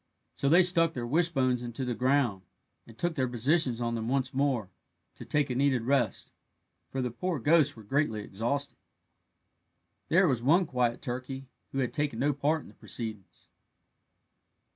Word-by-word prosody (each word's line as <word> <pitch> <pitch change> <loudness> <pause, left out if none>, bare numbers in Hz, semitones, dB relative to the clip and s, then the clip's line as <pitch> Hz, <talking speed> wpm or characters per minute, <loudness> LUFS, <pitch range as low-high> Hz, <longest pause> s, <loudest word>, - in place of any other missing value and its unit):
So 140 - 0
they 175 +5 +7
stuck 165 -2 +4
their 120 -2 -3
wishbones 135 -4 +1
into 120 +2 -4
the 125 - -1
ground, 125 -4 +1 0.5
and 115 -1 -15
took 175 -1 -1
their 130 -5 0
positions 125 +1 +1
on 120 -1 -1
them 115 -1 -3
once 130 0 0
more, 130 -8 0 0.4
to - - -10
take 145 -3 0
a - - 0
needed 135 -3 +2
rest, 125 -4 0 0.6
for 135 -1 -2
the 125 - -2
poor 170 +8 -2
ghosts 150 +3 +3
were 110 - -12
greatly 110 -1 0
exhausted. 120 +9 -3 1.3
There 180 +3 +5
was 130 -6 +1
one 165 +9 +4
quiet 125 -4 -1
turkey 130 +1 -5 0.3
who - - -5
had 130 -3 -1
taken 145 -6 -1
no 145 +4 +1
part 145 +3 0
in - - -14
the - - -16
proceedings. 110 -5 -8
130 Hz, 165 wpm, -29 LUFS, 120-145 Hz, 1.3 s, they